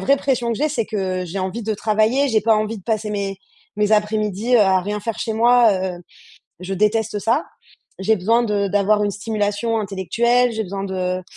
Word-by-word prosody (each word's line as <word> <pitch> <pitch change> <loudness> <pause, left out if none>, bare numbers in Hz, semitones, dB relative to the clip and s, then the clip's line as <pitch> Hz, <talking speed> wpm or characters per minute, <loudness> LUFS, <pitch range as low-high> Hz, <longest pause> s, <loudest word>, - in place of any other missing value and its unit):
vraie 275 +9 +3
pression 250 -4 0
que 225 - -4
j'ai, 305 +3 +1
c'est 275 -6 -1
que 185 -3 -2
j'ai 180 +3 -5
envie 190 +5 -3
de 220 +1 -1
travailler, 220 +7 +1
j'ai 220 -4 +1
pas 225 +1 +4
envie 215 +1 -2
de - - -15
passer 220 -1 -1
mes 200 -2 -3 0.4
mes 210 0 +1
après-midi, 215 +2 +1
heu, - - +5
à 190 -2 +4
rien 210 +2 -3
faire 225 +1 -4
chez 225 - -2
moi, 235 0 +5
heu. 185 -2 -3 0.6
Je 185 +2 -5
déteste 210 +2 +1
ça. 235 +9 0 0.5
J'ai 215 +3 +2
besoin 225 +5 +2
de 205 -3 0
d'avoir 205 +1 +2
une 205 - 0
stimulation 210 +2 -2
intellectuelle, 235 +5 +1
j'ai 220 -1 -3
besoin 195 0 -5
de 185 -1 -2
210 Hz, 200 wpm, -20 LUFS, 195-230 Hz, 0.6 s, heu